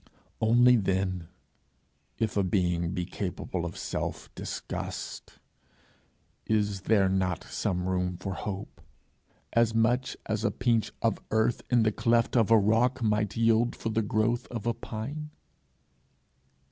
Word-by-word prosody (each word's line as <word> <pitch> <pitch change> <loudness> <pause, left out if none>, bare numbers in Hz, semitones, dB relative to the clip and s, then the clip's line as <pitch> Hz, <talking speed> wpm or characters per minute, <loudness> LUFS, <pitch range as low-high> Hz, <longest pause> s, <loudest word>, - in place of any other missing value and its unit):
Only, 120 +2 +6
then, 95 -3 -1 0.9
if 110 -2 -1
a 100 - +3
being 90 -3 +1
be 90 -2 -2
capable 90 -1 -4
of 85 - -8
self - - -4
disgust, - - -6 1.1
is 105 -3 +1
there 100 -2 +3
not 95 -2 0
some 90 -2 -2
room 90 -1 -1
for 95 +1 -4
hope 95 +1 -6 0.7
as 115 -1 +3
much 120 +3 +1
as 110 0 -2
a 110 - +3
pinch 115 +1 +1
of 115 -3 +2
earth 110 +2 +1
in 120 -2 +4
the 110 - +3
cleft 115 +3 +2
of 115 -3 +4
a 115 - +7
rock 115 +4 +2
might 105 -1 +1
yield 115 +1 +3
for 115 - -4
the 110 0 +1
growth 110 +3 0
of 115 -3 -6
a 120 - +2
pine? 140 +10 -6
110 Hz, 135 wpm, -28 LUFS, 95-115 Hz, 1.1 s, a